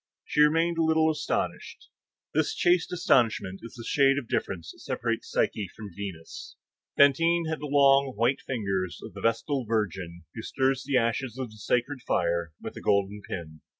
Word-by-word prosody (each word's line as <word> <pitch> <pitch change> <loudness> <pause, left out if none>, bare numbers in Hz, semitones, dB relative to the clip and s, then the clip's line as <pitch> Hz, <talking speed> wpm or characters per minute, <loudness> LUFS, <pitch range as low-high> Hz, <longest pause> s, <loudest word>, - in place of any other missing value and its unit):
She - - +1
remained 165 +3 +3
a - - +4
little 160 0 +3
astonished. 150 -1 -3 0.4
This - - +1
chaste 175 -1 +2
astonishment 115 - +2
is 115 - -10
the 115 -2 -9
shade 135 -1 +4
of 135 -5 -3
difference 85 -6 -3
which - - -18
separates - - -3
Psyche 100 -4 0
from 105 -2 -9
Venus. 95 -5 -8 0.4
Fantine 165 +5 +4
had 160 -1 -2
the 150 - -5
long, 140 -1 +4
white, 120 +5 +1
fine - - -30
fingers 95 -5 -2
of - - -9
the - - -9
vestal 115 +4 0
virgin 95 -6 -2
who 115 - -6
stirs 135 +2 0
the 135 -2 +2
ashes 120 +1 0
of 130 -4 -4
the 110 - -14
sacred 125 +6 -1
fire 85 -5 0
with - - -7
a - - -7
golden 100 +1 +1
pin. 80 -5 -7
120 Hz, 180 wpm, -27 LUFS, 100-145 Hz, 0.4 s, a